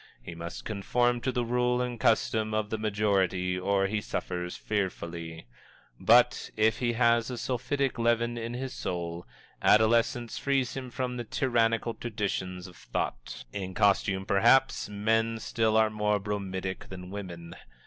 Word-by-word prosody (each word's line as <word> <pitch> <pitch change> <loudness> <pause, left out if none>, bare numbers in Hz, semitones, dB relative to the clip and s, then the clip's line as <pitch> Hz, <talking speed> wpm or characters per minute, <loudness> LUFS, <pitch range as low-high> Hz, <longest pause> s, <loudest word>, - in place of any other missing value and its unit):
He 85 - -9
must 85 +1 -7
conform 120 +4 +1
to 130 - 0
the 120 -1 -1
rule 125 +1 +1
and 125 -2 -2
custom 110 -1 +2
of 110 -1 -1
the 110 - -2
majority 95 -4 +1
or 95 +1 +1
he 105 +2 -1
suffers 90 -3 -4
fearfully. 85 - -4 0.5
But, - - +4
if 110 +1 +3
he 120 -1 +1
has 115 0 +3
a 125 - -4
sulphitic 130 +2 -1
leaven 120 0 +2
in 115 +1 -4
his 130 +1 -4
soul, 85 -1 -4 0.3
adolescence 115 +2 +3
frees 135 -2 0
him 130 -1 -5
from 125 0 -3
the 120 - -3
tyrannical 115 -2 +1
traditions 100 -6 -3
of 90 - -12
thought. - - -4
In 95 -2 -5
costume, 100 -1 +2
perhaps, 120 +6 +3
men 110 +2 +1
still 110 0 +1
are 110 -1 +4
more 105 -1 +1
bromidic 95 -2 -4
than 90 -1 -8
women. 85 -4 -7
110 Hz, 150 wpm, -29 LUFS, 95-120 Hz, 0.5 s, But